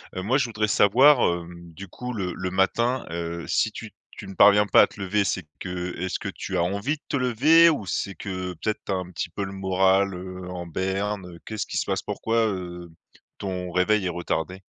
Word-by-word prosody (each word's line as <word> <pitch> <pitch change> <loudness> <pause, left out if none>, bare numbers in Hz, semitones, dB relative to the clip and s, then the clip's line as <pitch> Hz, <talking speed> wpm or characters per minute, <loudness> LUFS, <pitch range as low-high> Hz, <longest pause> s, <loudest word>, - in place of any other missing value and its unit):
Heu, 95 - -3
moi, 130 +7 +2
je 125 - +2
voudrais 110 -2 -1
savoir, 125 +8 +5 0.2
hem, 85 0 -12
du 100 +4 -9
coup, 125 +7 -6
le 90 -5 -3
le 95 0 -3
matin, 115 +7 +1
heu, 85 0 -4
si 110 - +1
tu 110 0 -9 0.3
tu 105 - -8
ne 95 - -8
parviens 105 +2 +6
pas - - +6
à - - +2
te - - -16
lever 100 +2 +1
c'est 95 -2 -2
que 90 -1 -4
est-ce 95 0 -2
que - - -4
tu - - -4
as 85 - +2
envie 100 - -1
de 150 - -21
te 140 - 0
lever 145 +7 +5
ou 140 -10 -1
c'est 100 +1 -3
que 95 -2 -5
peut-être, 110 +6 -3
tu - - -2
as - - +1
un 90 -1 -5
petit 85 - -4
peu 100 +5 -4
le 95 - -5
moral, 95 0 +2
heu, 90 0 -8
en 90 -1 -6
berne, 95 +2 -2
heu? - - -14
Qu'est-ce 110 -1 -4
qui - - -4
se - - 0
passe? - - -1
Pourquoi, 115 +1 -2
heu, 90 -3 -5 0.5
ton 90 -2 -4
réveil 95 +3 +2
est - - 0
retardé? 85 +1 -3
95 Hz, 230 wpm, -25 LUFS, 90-105 Hz, 0.5 s, parviens